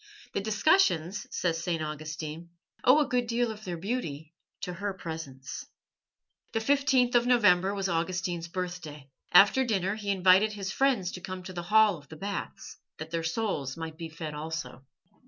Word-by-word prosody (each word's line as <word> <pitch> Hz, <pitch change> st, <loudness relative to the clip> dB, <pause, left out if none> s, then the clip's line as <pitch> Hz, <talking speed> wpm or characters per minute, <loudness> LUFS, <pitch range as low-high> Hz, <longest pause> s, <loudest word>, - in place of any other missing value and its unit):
The -, -, -1 dB
discussions, 210 Hz, -, +2 dB
says 165 Hz, -2 st, -1 dB
St. 170 Hz, -2 st, -1 dB
Augustine, 155 Hz, +1 st, -5 dB, 0.3 s
owed 290 Hz, +4 st, +6 dB
a -, -, -10 dB
good 245 Hz, -3 st, 0 dB
deal 235 Hz, 0 st, 0 dB
of 215 Hz, 0 st, -10 dB
their 180 Hz, -3 st, -4 dB
beauty 165 Hz, -, -4 dB, 0.3 s
to 180 Hz, -, -4 dB
her 200 Hz, +2 st, -3 dB
presence. 160 Hz, -7 st, -7 dB, 0.9 s
The 225 Hz, -, +1 dB
15th 265 Hz, 0 st, +3 dB
of 240 Hz, 0 st, +4 dB
November 200 Hz, -5 st, +4 dB
was 195 Hz, -1 st, -1 dB
Augustine's 175 Hz, 0 st, -1 dB
birthday. 170 Hz, -6 st, -6 dB, 0.2 s
After 205 Hz, +8 st, +7 dB
dinner 195 Hz, -5 st, 0 dB
he 210 Hz, -1 st, -5 dB
invited 190 Hz, +2 st, +5 dB
his 195 Hz, -2 st, -4 dB
friends 245 Hz, -8 st, +1 dB
to 180 Hz, -, -8 dB
come 185 Hz, 0 st, -6 dB
to 185 Hz, -, -8 dB
the 175 Hz, -, -4 dB
hall 215 Hz, -3 st, +5 dB
of 145 Hz, -, -20 dB
the 160 Hz, -, -9 dB
baths, 200 Hz, +4 st, -6 dB, 0.2 s
that 160 Hz, +1 st, -8 dB
their 165 Hz, -1 st, -1 dB
souls 160 Hz, -, -2 dB
might 160 Hz, -1 st, -6 dB
be 165 Hz, -1 st, -5 dB
fed 160 Hz, -1 st, -6 dB
also. 150 Hz, -4 st, -5 dB
185 Hz, 170 wpm, -29 LUFS, 160-215 Hz, 0.9 s, After